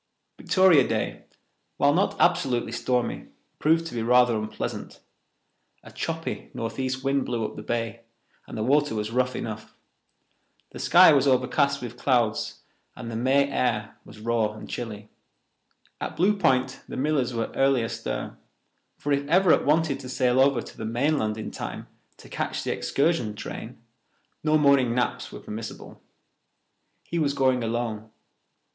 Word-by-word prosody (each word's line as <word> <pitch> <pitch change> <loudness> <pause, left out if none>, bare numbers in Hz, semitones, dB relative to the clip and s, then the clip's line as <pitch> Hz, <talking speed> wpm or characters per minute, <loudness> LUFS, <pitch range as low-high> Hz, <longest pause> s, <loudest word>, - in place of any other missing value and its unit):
Victoria 185 -8 +5
Day, - - -3 0.5
while 145 0 +4
not 190 +5 +1
absolutely 130 -10 +2
stormy, 125 +1 -1 0.3
proved 165 +2 +3
to 165 - -7
be 115 - -2
rather 125 0 +4
unpleasant. 110 0 -5 0.8
A - - -13
choppy 165 0 -4
northeast 130 +3 -3
wind 135 0 +1
blew 115 -3 -2
up - - -6
the - - -7
bay, 115 0 -3 0.5
and - - -8
the 110 - -1
water 145 +1 +2
was 105 0 -3
rough 125 +1 0
enough. 110 -1 -6 1.0
The - - -9
sky 180 -2 +7
was 140 -1 +3
overcast 140 +2 +2
with 120 0 -7
clouds, 120 -5 0 0.3
and 115 - -7
the - - -5
May 135 +4 +3
air 110 -6 -1
was 105 +1 -14
raw 110 -1 0
and 110 - -10
chilly. 110 -3 -6 0.9
At - - -5
Blue 200 +4 +3
Point 130 -8 +1
the - - -6
Millers 135 -3 0
were 115 - -2
early 135 -3 +2
astir, - - -5 0.6
for 145 - -3
if 140 0 +1
Everett 180 +2 +4
wanted 155 -2 +2
to 130 -2 -8
sail 125 0 +2
over 135 -3 +3
to - - -13
the - - -4
mainland 115 -1 0
in 110 - -5
time - - -6 0.3
to - - -14
catch - - -3
the - - -1
excursion 140 -8 0
train, - - -8 0.6
no 155 0 +4
morning 140 -5 +4
naps 125 - -1
were - - -9
permissible. 110 +1 -8 1.0
He 170 - -3
was 145 -3 +1
going 130 -2 +2
alone. 110 -1 -3
125 Hz, 150 wpm, -26 LUFS, 115-140 Hz, 1.0 s, sky